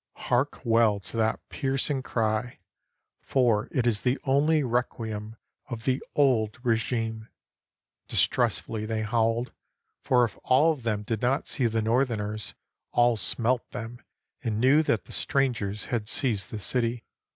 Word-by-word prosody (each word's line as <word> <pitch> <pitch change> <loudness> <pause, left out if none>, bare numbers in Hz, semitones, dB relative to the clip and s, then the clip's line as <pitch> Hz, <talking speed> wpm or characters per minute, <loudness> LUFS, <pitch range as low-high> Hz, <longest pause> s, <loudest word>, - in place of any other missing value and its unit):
(Hark 125 +4 -1
well 115 -3 +3
to 100 - -9
that 110 0 +1
piercing 135 0 -1
cry, 115 -1 -1 0.6
for 120 -6 +2
it 125 - 0
is 110 -4 +2
the 125 +2 +1
only 145 +3 +3
requiem 110 -3 -2 0.3
of 115 -3 -5
the 130 0 +1
old 120 -7 +2
regime!) 115 -1 -1 0.8
Distressfully 110 -1 0
they 110 -1 -1
howled, 115 +2 0 0.5
for 125 -1 +3
if 115 - -3
all 145 +6 +4
of 150 -5 -5
them 110 -3 -1
did 110 0 -3
not 130 +3 +1
see 125 - 0
the 110 -1 0
northerners, 110 -3 -1 0.4
all 120 -1 +4
smelt 115 +5 0
them 120 -1 -7 0.4
and 110 -3 -1
knew 135 +6 +5
that 120 -8 0
strangers 120 -8 -1
had 110 -3 -1
seized 110 -7 +1
the 110 - -5
city. 115 +2 -1
115 Hz, 140 wpm, -27 LUFS, 110-130 Hz, 0.8 s, knew